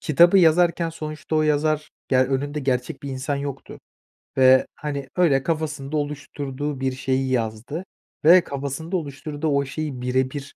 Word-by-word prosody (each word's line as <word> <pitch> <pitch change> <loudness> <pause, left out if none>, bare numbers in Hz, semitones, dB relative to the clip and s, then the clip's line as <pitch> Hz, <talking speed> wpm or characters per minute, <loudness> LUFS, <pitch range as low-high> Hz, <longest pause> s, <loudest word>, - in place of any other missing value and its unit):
kitabı 170 +5 +5
yazarken 170 0 +3
sonuçta 155 -1 -4
o 155 - +3
yazar, 150 0 +1 0.2
ge 130 - +3
önünde 135 +3 0
gerçek 130 +2 -2
bir 140 - -5
insan 135 +2 -2
yoktu 140 -1 -6 0.6
ve, 130 0 +6
hani, 140 -3 -5
öyle 140 -7 +3
kafasında 155 -3 -2
oluşturduğu 145 -1 -4
bir 135 0 0
şeyi 130 0 -1
yazdı 120 - -2 0.4
ve 175 +3 +8
kafasında 140 +6 -4
oluşturduğu 150 0 -5
o 140 -1 +2
şeyi 140 -2 -5
bire 130 +1 0
bir, 140 -1 -8
145 Hz, 150 wpm, -23 LUFS, 135-155 Hz, 0.6 s, ve